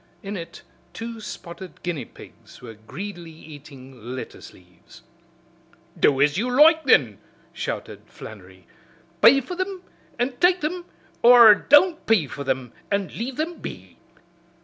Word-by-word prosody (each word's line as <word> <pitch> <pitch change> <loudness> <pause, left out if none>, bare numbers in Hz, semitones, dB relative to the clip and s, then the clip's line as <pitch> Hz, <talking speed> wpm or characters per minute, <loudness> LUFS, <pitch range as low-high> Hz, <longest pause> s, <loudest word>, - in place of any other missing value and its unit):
In 200 +1 -6
it 170 -2 -9 0.3
two 230 0 -7
spotted 175 -2 -10
guinea 165 -8 -4
pigs - - -16
were 120 -2 -11
greedily 170 - -9
eating 135 -6 -12
lettuce 130 - -9
leaves. 90 -1 -20 1.0
"Do 135 -2 +3
as 145 +4 +2
you 245 +3 -1
loike, 315 +5 +5
then!" 120 - +3 0.3
shouted - - -6
Flannery, 95 -4 -13 0.6
"pay 250 +6 +7
for 270 - -8
thim 370 0 -5 0.3
an' 245 +1 -2
take 355 +3 +3
thim, 345 +4 -4 0.4
or 235 -2 +9
don't 315 - +3
pay 215 -8 +3
for 140 +1 -8
thim 130 -3 -3 0.2
and 200 -2 -2
leave 245 +3 -5
thim 325 +3 -4
be. - - -10
195 Hz, 135 wpm, -23 LUFS, -, 1.0 s, or